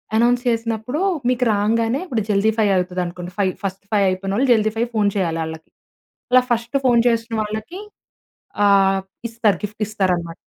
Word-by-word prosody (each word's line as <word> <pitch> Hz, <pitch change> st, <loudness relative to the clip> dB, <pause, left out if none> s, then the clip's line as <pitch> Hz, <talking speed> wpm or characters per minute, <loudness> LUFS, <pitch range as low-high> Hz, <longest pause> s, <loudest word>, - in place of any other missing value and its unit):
Announce 240 Hz, +2 st, +3 dB
చేసినప్పుడు 230 Hz, +4 st, -2 dB, 0.3 s
మీకు 250 Hz, 0 st, +1 dB
రాంగానే 225 Hz, +5 st, +1 dB
ఇప్పుడు 235 Hz, -10 st, -2 dB
జల్దీ 210 Hz, +1 st, +3 dB
ఫైవ్ 210 Hz, -3 st, +3 dB
అయితది 180 Hz, 0 st, -1 dB
అనుకోండి 175 Hz, +1 st, -7 dB
ఫైవ్ 190 Hz, -2 st, +1 dB
ఫస్ట్ 195 Hz, 0 st, -4 dB
ఫైవ్ 200 Hz, -2 st, +3 dB
అయిపోయినోళ్ళు 195 Hz, +7 st, -1 dB
జల్దీ 220 Hz, -1 st, +1 dB
ఫైవ్ 235 Hz, +2 st, 0 dB
ఫోన్ 205 Hz, -1 st, +3 dB
చేయాలి 165 Hz, -4 st, -1 dB
ఆళ్ళకి. 160 Hz, 0 st, -9 dB, 0.6 s
అలా 255 Hz, -, +7 dB
ఫస్ట్ 235 Hz, +3 st, 0 dB
ఫోన్ 240 Hz, -2 st, +5 dB
చేసిన 230 Hz, 0 st, -2 dB
వాళ్ళకి 215 Hz, -, -6 dB, 0.9 s
ఆహ్, 195 Hz, -1 st, +4 dB, 0.3 s
ఇస్తారు 220 Hz, -4 st, +1 dB
గిఫ్ట్ 210 Hz, +1 st, -5 dB
ఇస్తారన్నమాట. 180 Hz, -5 st, -1 dB
215 Hz, 155 wpm, -20 LUFS, 195-230 Hz, 0.9 s, అలా